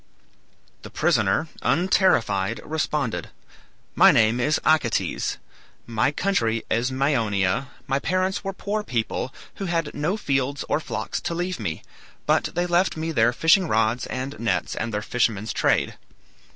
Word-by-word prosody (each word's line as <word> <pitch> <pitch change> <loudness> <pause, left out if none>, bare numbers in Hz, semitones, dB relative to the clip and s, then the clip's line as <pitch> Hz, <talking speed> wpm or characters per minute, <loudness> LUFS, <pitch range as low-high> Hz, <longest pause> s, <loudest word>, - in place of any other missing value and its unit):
The - - -10
prisoner, - - +1
unterrified, 125 - +2
responded, 150 -5 -2 0.6
"My - - +7
name 110 +2 +3
is 150 +5 +2
Acetes; 140 -8 +1 0.5
my 115 +3 +1
country 115 - 0
is 120 +3 +1
Maeonia; 115 -5 +1 0.2
my 135 +1 0
parents 185 +4 -1
were 195 - -2
poor 205 +2 -3
people, 125 - -2 0.3
who 195 - -4
had 165 -4 -1
no 160 +8 -1
fields 140 -5 -1
or - - +1
flocks - - -4
to 170 - -3
leave 180 +1 -2
me, 80 - -4 0.4
but - - +2
they 175 +1 +1
left 175 0 +1
me 160 +1 -2
their 120 -5 +3
fishing 165 +8 +4
rods 115 0 +1
and 130 +2 -5
nets 105 -6 -1
and 115 - -3
their 105 -1 -2
fisherman's 110 -3 0
trade. - - +1
135 Hz, 140 wpm, -24 LUFS, 115-170 Hz, 0.6 s, My